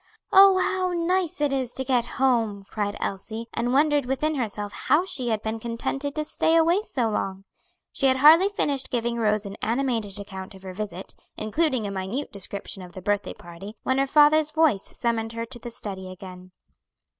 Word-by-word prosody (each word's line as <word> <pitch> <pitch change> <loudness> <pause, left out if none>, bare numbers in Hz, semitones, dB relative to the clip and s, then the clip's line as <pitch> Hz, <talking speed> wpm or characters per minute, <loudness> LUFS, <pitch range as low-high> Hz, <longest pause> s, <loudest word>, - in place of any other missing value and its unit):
"Oh, 390 0 +8
how 370 -1 0
nice 345 -1 0
it 290 -2 +1
is 260 -3 -1
to 265 - 0
get 250 -2 +2
home!" 230 -6 +1
cried 205 -1 -3
Elsie, 220 +4 -4
and 240 +1 -1
wondered 290 0 +3
within 285 +4 0
herself 210 -6 -3
how 330 +5 +2
she 260 -9 -2
had 220 -1 -1
been 220 +1 -3
contented 255 +5 -3
to 305 -1 -2
stay 320 +2 +1
away 335 +4 +4
so 260 - -2
long. 195 -2 -3 0.5
She 275 - +2
had 260 0 +3
hardly 320 +8 +7
finished 285 -9 0
giving 235 -1 -1
Rose 215 -2 +1
an 200 +1 -7
animated 230 -4 -1
account 195 -1 -8
of 190 - -15
her 185 -1 -7
visit, 195 -2 -6 0.2
including 255 +2 0
a 200 - -3
minute 195 +9 -4
description 200 0 -4
of 180 -1 -11
the 185 - -8
birthday 205 0 -1
party, 175 +5 -10
when 260 +1 +1
her 275 - +2
father's 300 +2 +5
voice 305 -10 +2
summoned 230 -1 -1
her 230 0 -4
to 240 +1 -11
the 240 - -7
study 190 -5 -6
again. 185 0 -11
235 Hz, 190 wpm, -25 LUFS, 205-290 Hz, 0.5 s, Oh